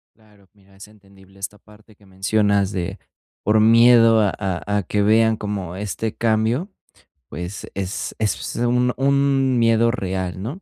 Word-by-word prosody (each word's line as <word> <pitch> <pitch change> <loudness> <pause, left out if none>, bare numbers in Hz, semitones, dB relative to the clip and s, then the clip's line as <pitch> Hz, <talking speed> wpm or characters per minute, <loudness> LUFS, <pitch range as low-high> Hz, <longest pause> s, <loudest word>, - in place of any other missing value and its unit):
Claro, 105 -3 -25
mira, 100 -1 -25
es 95 +2 -13
entendible 100 -2 -21
esta 105 +1 -6
parte 105 0 -21
que 100 - -24
mencionas 100 +1 0
de, 95 +2 -4 0.4
por 110 0 +3
miedo 115 0 +6
a 105 -2 +3
a 100 +1 -2
a 100 - -1
que 105 +3 -1
vean 110 +1 +3
cómo 100 -4 -5
este 105 +2 -4
cambio, 115 - 0 0.6
pues 90 +4 -7
es 95 0 -4
es 110 -2 -2
un 125 +1 +1
un 135 -1 +2
miedo 115 0 +3
real, 95 -5 -3
¿no?, 140 - -6
105 Hz, 155 wpm, -21 LUFS, 100-115 Hz, 0.6 s, miedo